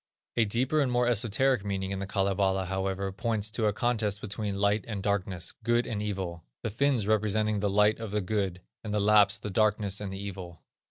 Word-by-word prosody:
A 115 Hz, -, +3 dB
deeper 130 Hz, +8 st, +1 dB
and 130 Hz, -3 st, +1 dB
more 120 Hz, 0 st, +2 dB
esoteric 120 Hz, +1 st, +2 dB
meaning 95 Hz, -1 st, -2 dB
of 95 Hz, -, -4 dB
the 100 Hz, -, -4 dB
Kalevala, 95 Hz, -1 st, +1 dB
however, 95 Hz, +1 st, -2 dB
points 105 Hz, +1 st, -1 dB
to 110 Hz, -2 st, +1 dB
a -, -, +3 dB
contest 105 Hz, -2 st, 0 dB
between 105 Hz, -1 st, -4 dB
Light 100 Hz, +1 st, +2 dB
and 105 Hz, -4 st, -4 dB
Darkness, 95 Hz, -4 st, -1 dB
Good 120 Hz, +1 st, +2 dB
and 105 Hz, -3 st, -3 dB
Evil; 95 Hz, -5 st, -4 dB, 0.2 s
the 115 Hz, -, -2 dB
Finns 125 Hz, -1 st, +1 dB
representing 110 Hz, 0 st, +1 dB
the 100 Hz, 0 st, 0 dB
Light 105 Hz, +2 st, +3 dB
and 110 Hz, -3 st, -5 dB
the 105 Hz, -, +1 dB
Good, 95 Hz, -2 st, -2 dB, 0.2 s
and 105 Hz, -1 st, -3 dB
the -, -, +2 dB
Lapps, 105 Hz, 0 st, +5 dB
the 105 Hz, 0 st, -6 dB
Darkness 105 Hz, -1 st, +1 dB
and 100 Hz, -2 st, -4 dB
the 95 Hz, -, -5 dB
Evil. 95 Hz, -4 st, -7 dB
105 Hz, 205 wpm, -29 LUFS, 95-110 Hz, 0.2 s, Lapps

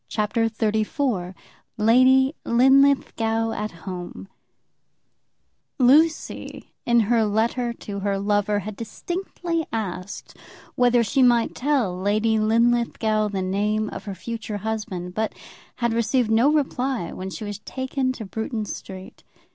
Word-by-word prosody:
CHAPTER 225 Hz, +1 st, 0 dB
XXXIV 215 Hz, -2 st, -1 dB, 0.4 s
Lady 255 Hz, +5 st, +5 dB
Linlithgow 240 Hz, -3 st, +3 dB
at 215 Hz, -1 st, -3 dB
Home 180 Hz, 0 st, -7 dB, 1.5 s
Lucy, 300 Hz, +5 st, +2 dB
in 235 Hz, -1 st, +5 dB
her 225 Hz, +1 st, +2 dB
letter 230 Hz, +3 st, 0 dB
to 205 Hz, -3 st, -7 dB
her 200 Hz, 0 st, -1 dB
lover, 205 Hz, +1 st, +1 dB
had 210 Hz, +1 st, -7 dB
distinctly 335 Hz, -, -4 dB
asked 195 Hz, -4 st, -5 dB, 0.4 s
whether 245 Hz, -1 st, +3 dB
she 270 Hz, +4 st, +1 dB
might 240 Hz, -2 st, +4 dB
tell 255 Hz, -9 st, 0 dB
Lady 215 Hz, +4 st, +1 dB
Linlithgow 225 Hz, -1 st, +2 dB
the 195 Hz, -2 st, -3 dB
name 210 Hz, +3 st, 0 dB
of -, -, -8 dB
her 200 Hz, -2 st, -5 dB
future 220 Hz, +1 st, -5 dB
husband, 205 Hz, -4 st, -4 dB
but 220 Hz, +2 st, -2 dB, 0.4 s
had 235 Hz, -2 st, 0 dB
received 230 Hz, 0 st, +1 dB
no 235 Hz, +6 st, +4 dB
reply 265 Hz, -, -1 dB
when 190 Hz, +1 st, -6 dB
she 215 Hz, -, -7 dB
was 205 Hz, -1 st, -5 dB
taken 260 Hz, +3 st, -2 dB
to 230 Hz, -4 st, -7 dB
Bruton 220 Hz, +2 st, -4 dB
Street. 190 Hz, -2 st, -9 dB
225 Hz, 125 wpm, -23 LUFS, 205-245 Hz, 1.5 s, Lady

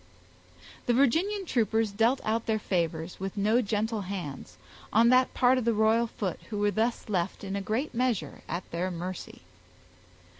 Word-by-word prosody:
The 240 Hz, -, +4 dB
Virginian 350 Hz, -, +2 dB
troopers 225 Hz, -, +1 dB
dealt 230 Hz, +6 st, +2 dB
out 225 Hz, +1 st, -1 dB
their 220 Hz, -1 st, +2 dB
favors, 170 Hz, -4 st, -2 dB
with 195 Hz, +2 st, -5 dB
no 215 Hz, +5 st, +3 dB
gentle 220 Hz, 0 st, -1 dB
hands, 175 Hz, -, -6 dB, 0.3 s
on 230 Hz, +2 st, +5 dB
that 255 Hz, +1 st, +4 dB
part 255 Hz, 0 st, +4 dB
of -, -, -3 dB
the 230 Hz, -2 st, +2 dB
royal 220 Hz, +2 st, +3 dB
foot 195 Hz, -5 st, -4 dB
who 210 Hz, -, -4 dB
were 205 Hz, 0 st, +2 dB
thus 225 Hz, +3 st, -1 dB
left 190 Hz, -2 st, -2 dB
in 195 Hz, 0 st, -4 dB
a 200 Hz, -, -2 dB
great 220 Hz, +10 st, -2 dB
measure 230 Hz, -, -1 dB
at 175 Hz, +2 st, -2 dB
their 175 Hz, +2 st, -1 dB
mercy. 180 Hz, +1 st, -6 dB
215 Hz, 165 wpm, -28 LUFS, 190-235 Hz, 0.3 s, on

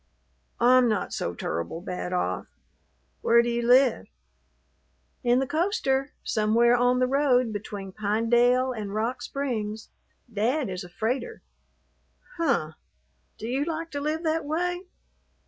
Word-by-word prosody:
"I'm 250 Hz, 0 st, +5 dB
not 215 Hz, -3 st, -1 dB
so -, -, -3 dB
tur'ble 85 Hz, -, -4 dB
bad 180 Hz, 0 st, -5 dB
off. 180 Hz, -, -1 dB, 0.7 s
Where 235 Hz, 0 st, +5 dB
do 240 Hz, -, -1 dB
you 235 Hz, 0 st, 0 dB
live?" 250 Hz, +2 st, +4 dB, 1.2 s
"In 245 Hz, 0 st, +3 dB
the 265 Hz, -, +1 dB
coaster, 285 Hz, -, 0 dB
somewhere 230 Hz, +2 st, +3 dB
on 245 Hz, +1 st, +3 dB
the 255 Hz, -, +3 dB
road 255 Hz, -3 st, +2 dB
between 200 Hz, -1 st, -6 dB
Pinedale 235 Hz, +5 st, +2 dB
and 210 Hz, -3 st, -5 dB
Rock 230 Hz, +4 st, -1 dB
Springs. 220 Hz, -6 st, -4 dB, 0.4 s
Dad 240 Hz, +5 st, 0 dB
is 185 Hz, +1 st, -5 dB
a 180 Hz, -, -11 dB
freighter." 240 Hz, +6 st, -3 dB, 0.9 s
"Huh! 270 Hz, -, +1 dB, 0.7 s
Do 220 Hz, -, -6 dB
you 265 Hz, +4 st, 0 dB
like 330 Hz, +1 st, -4 dB
to 285 Hz, -, -4 dB
live 310 Hz, +3 st, -2 dB
that 320 Hz, 0 st, 0 dB
way?" 355 Hz, +4 st, -2 dB
245 Hz, 130 wpm, -26 LUFS, 215-275 Hz, 1.2 s, I'm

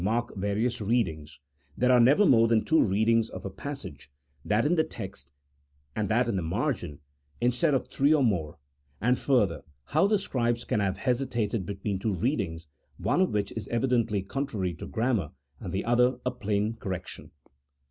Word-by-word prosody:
mark 115 Hz, +4 st, 0 dB
various 105 Hz, +5 st, -1 dB
readings, 80 Hz, -10 st, -1 dB, 0.4 s
there 125 Hz, +1 st, +3 dB
are 125 Hz, -, +6 dB
never 140 Hz, -, +5 dB
more 115 Hz, -7 st, +5 dB
than 115 Hz, -1 st, +2 dB
two 160 Hz, -, +4 dB
readings 110 Hz, +3 st, +2 dB
of -, -, -8 dB
a 95 Hz, -, -4 dB
passage, 135 Hz, -, -8 dB, 0.3 s
that 105 Hz, +4 st, +1 dB
in 155 Hz, -, +3 dB
the 160 Hz, -2 st, +3 dB
text 95 Hz, -, -8 dB, 0.6 s
and 105 Hz, -3 st, -1 dB
that 120 Hz, +3 st, +2 dB
in 115 Hz, -, -1 dB
the 95 Hz, -, 0 dB
margin, 90 Hz, -, -2 dB, 0.4 s
instead 125 Hz, +5 st, +2 dB
of 130 Hz, -, -1 dB
three 140 Hz, +2 st, +2 dB
or 155 Hz, -3 st, +4 dB
more; 85 Hz, -9 st, 0 dB, 0.4 s
and 125 Hz, +2 st, +2 dB
further, 105 Hz, -, +2 dB, 0.2 s
how 160 Hz, +7 st, +2 dB
the 210 Hz, 0 st, +3 dB
scribes 120 Hz, -, -1 dB
can 110 Hz, -, -1 dB
have 95 Hz, -2 st, 0 dB
hesitated 120 Hz, -4 st, -1 dB
between 100 Hz, -1 st, -3 dB
two 105 Hz, 0 st, -1 dB
readings, 85 Hz, -, -2 dB, 0.3 s
one 180 Hz, -, +1 dB
of 185 Hz, -, +3 dB
which 100 Hz, -1 st, -1 dB
is 110 Hz, -, -6 dB
evidently 115 Hz, -4 st, +1 dB
contrary 105 Hz, -6 st, -3 dB
to 85 Hz, -, -8 dB
grammar, 115 Hz, -, 0 dB, 0.3 s
and 90 Hz, -, -6 dB
the 95 Hz, -, -2 dB
other 125 Hz, +2 st, +3 dB
a 125 Hz, -, +1 dB
plain 105 Hz, -2 st, -1 dB
correction. 95 Hz, -4 st, -6 dB
115 Hz, 175 wpm, -28 LUFS, 95-125 Hz, 0.6 s, are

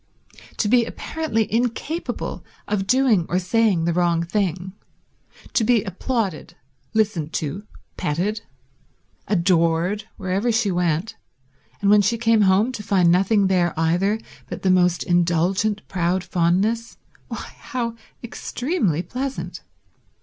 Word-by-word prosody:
To 210 Hz, -, +1 dB
be 240 Hz, +2 st, +4 dB
apparently 230 Hz, -2 st, -2 dB
incapable 245 Hz, +8 st, -2 dB, 0.2 s
of 200 Hz, -2 st, -1 dB
doing 245 Hz, -8 st, +3 dB
or 180 Hz, -, +1 dB
saying 185 Hz, -2 st, +2 dB
the 170 Hz, -, +1 dB
wrong 170 Hz, -1 st, +2 dB
thing, 185 Hz, 0 st, -2 dB, 0.8 s
to 230 Hz, -, +2 dB
be 225 Hz, -2 st, +3 dB
applauded, 195 Hz, -2 st, -3 dB, 0.4 s
listened 190 Hz, -8 st, 0 dB
to, 180 Hz, +8 st, -3 dB, 0.3 s
petted, 190 Hz, +9 st, -1 dB, 0.9 s
adored 175 Hz, +1 st, +1 dB
wherever 195 Hz, +4 st, 0 dB
she 225 Hz, -3 st, +1 dB
went, 175 Hz, +2 st, -1 dB, 0.6 s
and 200 Hz, -, +3 dB
when 210 Hz, 0 st, +7 dB
she 220 Hz, +4 st, +1 dB
came 225 Hz, -1 st, +3 dB
home 200 Hz, +5 st, +4 dB
to 240 Hz, -, -6 dB
find 185 Hz, -4 st, +3 dB
nothing 195 Hz, +3 st, +3 dB
there 180 Hz, -4 st, +1 dB
either 180 Hz, +7 st, +1 dB, 0.3 s
but -, -, -6 dB
the 190 Hz, -, +4 dB
most 180 Hz, -1 st, +3 dB
indulgent 180 Hz, +4 st, +1 dB
proud 180 Hz, 0 st, 0 dB
fondness—why, 190 Hz, +7 st, -2 dB
how 240 Hz, -5 st, -3 dB, 0.3 s
extremely 235 Hz, -, -2 dB
pleasant. 265 Hz, +5 st, -5 dB
195 Hz, 120 wpm, -22 LUFS, 175-225 Hz, 0.9 s, when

